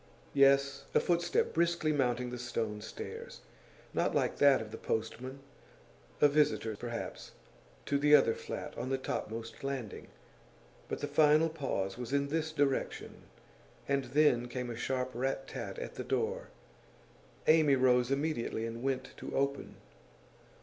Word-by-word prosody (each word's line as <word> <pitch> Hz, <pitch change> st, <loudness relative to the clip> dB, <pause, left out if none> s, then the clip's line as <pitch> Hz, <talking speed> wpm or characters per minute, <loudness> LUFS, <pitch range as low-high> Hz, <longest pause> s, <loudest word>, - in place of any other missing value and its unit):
Yes, 140 Hz, 0 st, +4 dB
a -, -, +7 dB
footstep, 175 Hz, 0 st, +1 dB
briskly 170 Hz, -2 st, +2 dB
mounting 125 Hz, -3 st, 0 dB
the 125 Hz, -, -5 dB
stone 115 Hz, -3 st, -3 dB
stairs. 110 Hz, -, -8 dB, 0.5 s
Not -, -, +1 dB
like -, -, +1 dB
that 140 Hz, -2 st, +6 dB
of 110 Hz, -1 st, -7 dB
the 115 Hz, -, -7 dB
postman. 125 Hz, +5 st, -3 dB, 0.8 s
A -, -, +8 dB
visitor, 145 Hz, -7 st, +1 dB
perhaps, 120 Hz, +2 st, -6 dB, 0.5 s
to 140 Hz, -, +1 dB
the 150 Hz, +1 st, +7 dB
other 135 Hz, -5 st, +5 dB
flat -, -, -6 dB
on 125 Hz, +2 st, -3 dB
the 135 Hz, -, +1 dB
topmost 115 Hz, -3 st, -5 dB
landing. 135 Hz, -6 st, -4 dB, 0.8 s
But -, -, -4 dB
the 145 Hz, -, -1 dB
final 150 Hz, +2 st, +4 dB
pause 125 Hz, -10 st, -3 dB
was 125 Hz, +1 st, -5 dB
in 140 Hz, 0 st, +1 dB
this 160 Hz, +1 st, -1 dB
direction, 145 Hz, -3 st, -1 dB, 0.6 s
and 140 Hz, -1 st, +1 dB
then 135 Hz, -5 st, +3 dB
came 125 Hz, 0 st, -4 dB
a -, -, -5 dB
sharp 130 Hz, +2 st, -2 dB
rat 135 Hz, +2 st, -2 dB
tat -, -, -6 dB
at -, -, -6 dB
the -, -, -5 dB
door. -, -, -1 dB, 1.0 s
Amy 155 Hz, -3 st, +5 dB
rose 125 Hz, -1 st, +3 dB
immediately 135 Hz, -5 st, -1 dB
and 115 Hz, +1 st, -5 dB
went 130 Hz, 0 st, -2 dB
to -, -, -6 dB
open. 140 Hz, 0 st, -1 dB
135 Hz, 145 wpm, -32 LUFS, 120-145 Hz, 1.0 s, A